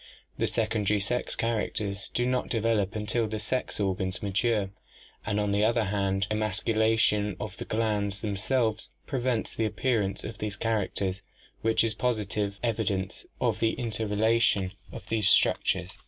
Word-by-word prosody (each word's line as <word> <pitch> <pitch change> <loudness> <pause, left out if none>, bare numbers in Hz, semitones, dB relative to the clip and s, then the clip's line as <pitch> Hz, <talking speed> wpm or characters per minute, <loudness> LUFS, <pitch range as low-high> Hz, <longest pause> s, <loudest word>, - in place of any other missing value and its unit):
The - - +2
secondary 105 -1 +1
sex 125 +5 0
characters 105 -3 -2
do 120 - +2
not 125 0 0
develop 110 -4 +1
until 110 +2 0
the 110 0 -3
sex 125 +3 -1
organs 95 -1 -1
mature, 105 0 +1 0.6
and 105 0 +1
on 105 -1 +1
the 100 +1 +2
other 115 +1 +3
hand 95 -1 0
emasculation 110 -1 +2
of 105 -2 -5
the - - -5
glands 105 -3 -1
themselves 110 +2 0 0.2
pre 135 - -2
vents 120 -2 0
the 115 - 0
appearance 110 -4 0
of 110 -2 -7
these 105 -2 -2
characters, 100 -3 -1 0.4
which 115 0 +3
is 115 -1 +2
positive 105 -4 -1
evi 115 -3 0
dence 95 -1 -2
of - - +1
the 115 -1 +2
interrelation 110 -3 +1 0.2
of - - -9
these 110 -3 +2
structures. - - +2
105 Hz, 150 wpm, -28 LUFS, 100-115 Hz, 0.6 s, other